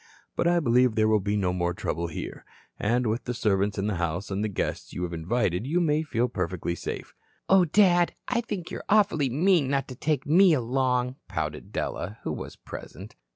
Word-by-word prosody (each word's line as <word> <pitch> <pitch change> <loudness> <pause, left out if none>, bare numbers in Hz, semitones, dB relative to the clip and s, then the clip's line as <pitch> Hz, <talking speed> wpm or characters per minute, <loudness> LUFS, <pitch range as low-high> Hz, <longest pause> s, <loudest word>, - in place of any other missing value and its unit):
But 170 - +1
I 175 0 +4
believe 125 -5 +3
there 110 0 +3
will 110 -1 +4
be 100 +1 -1
no 90 -3 +1
more 90 -1 -1
trouble 85 -1 -2
here. 80 - -6 0.4
And 120 +4 +1
with 115 +2 -1
the 125 - -3
servants 105 -2 +1
in 100 - -1
the 105 -3 -1
house 85 +4 -2
and 100 +2 -1
the - - +1
guests 100 - -3
you 90 - -3
have 85 -1 -3
invited, 90 +4 -1
you 170 +5 +1
may 155 -3 +2
feel 125 -6 0
perfectly 90 -4 -2
safe." - - -6 0.3
"Oh, 190 -2 +6
Dad, 175 0 +4
I 245 -2 +1
think 200 -7 -5
you're - - -5
awfully 195 -10 +3
mean 165 +2 +3
not 135 0 0
to 130 - -7
take 145 +1 -1
me 175 +4 +6
along," 125 0 0
pouted - - -4
Della, 100 +6 -3
who - - -2
was - - -7
present. - - -10
125 Hz, 200 wpm, -27 LUFS, 100-155 Hz, 0.4 s, Oh